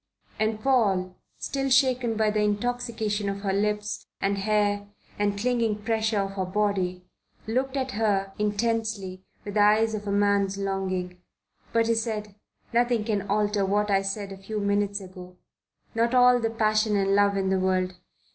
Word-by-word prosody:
And 215 0 0
Paul, 195 -9 +2 0.2
still 270 -1 -2
shaken 255 -4 +3
by 215 -1 +2
the 210 0 0
intoxication 215 -1 -1
of 200 0 -4
her 195 -1 -1
lips 210 +1 -1
and 200 0 0
hair 205 0 +1 0.3
and 205 -1 +1
clinging 225 -2 0
pressure 220 -2 +1
of 195 0 -3
her 190 -1 -3
body, 185 -2 -1 0.4
looked 260 +5 -1
at 260 -1 -2
her 200 -3 0
intensely 210 -3 -1 0.2
with 205 - -5
the 210 - +1
eyes 215 +2 +4
of 210 -1 -5
a - - -1
man's 200 -1 +2
longing. 185 -2 -3 0.5
But 230 0 +2
he 230 - +2
said: 220 -2 -2 0.4
"Nothing 240 -1 +2
can 205 -3 -2
alter 205 0 +1
what 205 +2 +1
I 195 -1 +3
said 195 +1 -3
a 195 - -7
few 210 +3 -5
minutes 200 0 0
ago 180 -1 -11 0.6
not 235 +2 +1
all 250 0 +6
the 225 -1 0
passion 215 -1 +1
and 195 0 +2
love 200 0 +3
in 190 -1 0
the 190 - +2
world. 185 0 0
210 Hz, 165 wpm, -26 LUFS, 195-225 Hz, 0.6 s, all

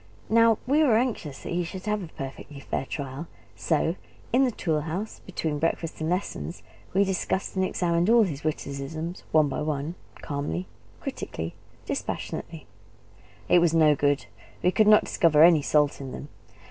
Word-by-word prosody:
Now, 230 -1 +5
we 285 +5 +3
were 250 -8 +5
anxious 220 - -2
that - - -5
he 175 +1 +1
should 185 +3 -7
have 210 -1 0
a 180 - -6
perfectly 140 -1 -8
fair 135 0 -3
trial; 140 +2 -5 0.3
so 160 +1 +1 0.4
in 265 +2 +5
the 250 - +1
tool 160 -8 -1
house, 175 +8 -5
between 160 -5 -2
breakfast 165 0 -2
and 155 - -1
lessons, 180 -1 -3 0.3
we 195 +2 +4
discussed 190 0 -1
and 190 - +1
examined 175 0 +1
all 235 0 +7
his 150 -8 -3
witticisms, 155 +3 -4
one 155 -2 +5
by 135 - -3
one, 150 +1 -2 0.3
calmly, 140 - -3 0.4
critically, 80 +1 -5 0.3
dispassionately. - - -4 0.8
It 180 - +6
was 170 -1 +3
no 155 -2 +5
good; 145 0 +1 0.4
we 180 - +4
could 215 +2 +3
not 215 0 +7
discover 155 -2 +4
any 165 -3 +7
salt 145 0 +2
in 135 -1 -6
them. 145 - -8
165 Hz, 165 wpm, -26 LUFS, 145-190 Hz, 0.8 s, all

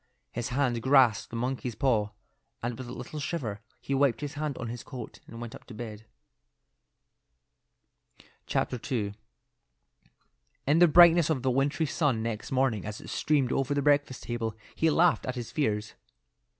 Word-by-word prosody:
His 120 0 -3
hand 125 -3 0
grasped 130 -4 +4
the - - -7
monkey's 125 0 -2
paw, 110 -4 +2 0.5
and 120 0 -2
with 130 +1 -8
a - - -7
little 150 +4 -7
shiver 135 -10 -3 0.2
he 140 - -4
wiped 135 -2 +2
his 145 0 -4
hand 150 -2 -3
on 120 - -4
his 120 +1 -5
coat 125 -5 -8
and 115 - -9
went 120 -1 -7
up - - -11
to 120 - -11
bed. 110 -2 -7 2.4
II. 115 -5 -1 1.5
In 150 +4 +4
the 175 - +8
brightness 170 0 +7
of 135 -5 0
the 130 - +2
wintry 140 +5 +1
sun 140 -7 0
next 115 -2 -4
morning 130 -7 +1
as 105 0 -6
it - - -9
streamed 140 -5 +1
over 135 +1 0
the 140 - 0
breakfast 145 -3 +2
table 115 -2 -3 0.2
he 160 - +2
laughed 165 -2 +3
at 130 - -2
his 120 -2 -5
fears. 110 -7 -1
130 Hz, 165 wpm, -29 LUFS, 115-145 Hz, 2.4 s, the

